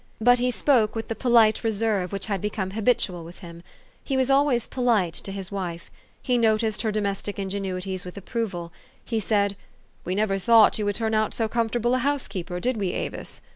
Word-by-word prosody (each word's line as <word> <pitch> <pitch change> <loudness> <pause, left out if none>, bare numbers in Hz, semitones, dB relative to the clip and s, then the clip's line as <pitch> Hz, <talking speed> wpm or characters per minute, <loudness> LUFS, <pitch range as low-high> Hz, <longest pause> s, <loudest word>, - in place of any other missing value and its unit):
But 245 +2 +5
he 250 +1 +1
spoke 245 -4 +2
with 225 - -4
the 225 - -2
polite 230 -4 +4
reserve 215 -4 0
which 195 -1 -3
had 200 -4 -2
become 210 -2 -3
habitual 205 -5 0
with 170 +2 -11
him. 170 0 -10 0.4
He 270 - -1
was 260 +1 +2
always 270 -4 +3
polite 225 -9 +1
to 195 - -6
his 195 -1 -6
wife. 175 -4 -5 0.3
He 250 -2 +2
noticed 220 -1 +2
her 220 - 0
domestic 205 -1 -2
ingenuities 190 -1 -3
with 180 +2 -9
approval. 195 -5 -4 0.3
He 225 -2 -1
said, 200 -1 +1
4 200 - -14 0.2
' - - -35
We 185 - -2
never 200 -1 +1
thought 225 +3 +5
}'ou 210 - -1
would 205 0 0
turn 220 0 -1
out 215 -1 +1
so 225 - +1
com 230 +1 0
fortable 240 +1 0
a - - +1
housekeeper, 200 -10 -2
did 250 +5 -1
we, 195 -4 -1
Avis?' - - -5
215 Hz, 205 wpm, -25 LUFS, 190-235 Hz, 0.4 s, But